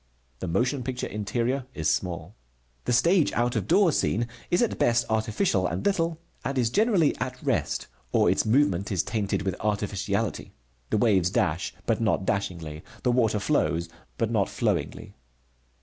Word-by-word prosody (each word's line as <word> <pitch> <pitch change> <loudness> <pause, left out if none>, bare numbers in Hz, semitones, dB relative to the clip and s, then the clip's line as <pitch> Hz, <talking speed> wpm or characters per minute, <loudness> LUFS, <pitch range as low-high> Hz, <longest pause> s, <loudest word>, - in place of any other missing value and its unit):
The - - -4
motion 125 - 0
picture 125 +1 -3
interior 120 +5 -2
is 80 -2 -1
small. 85 +4 -1 0.5
The - - 0
stage 170 +7 +4
out 120 +1 +1
of 105 -3 -1
door 195 - +5
scene 115 -4 0 0.2
is 175 +6 +3
at 235 - -1
best 120 0 +3
artificial 110 - +1
and 85 +2 -4
little 165 -5 +1 0.2
and 135 +2 -2
is 120 -2 +2
generally 200 - +3
at 125 0 -4
rest, - - 0 0.3
or - - +3
its - - +3
movement 110 -6 +2
is 95 -4 +1
tainted 100 -1 -1
with 95 -1 -1
artificiality. 100 -1 -2 0.4
The - - +1
waves 100 -5 +3
dash, 85 -2 0
but 115 -1 0
not 105 -3 +1
dashingly, 85 -6 -2 0.2
the 125 - +3
water 110 -4 +2
flows, 85 - 0 0.3
but 115 0 0
not 105 -4 +1
flowingly. 100 -6 -2
110 Hz, 160 wpm, -26 LUFS, 95-125 Hz, 0.5 s, door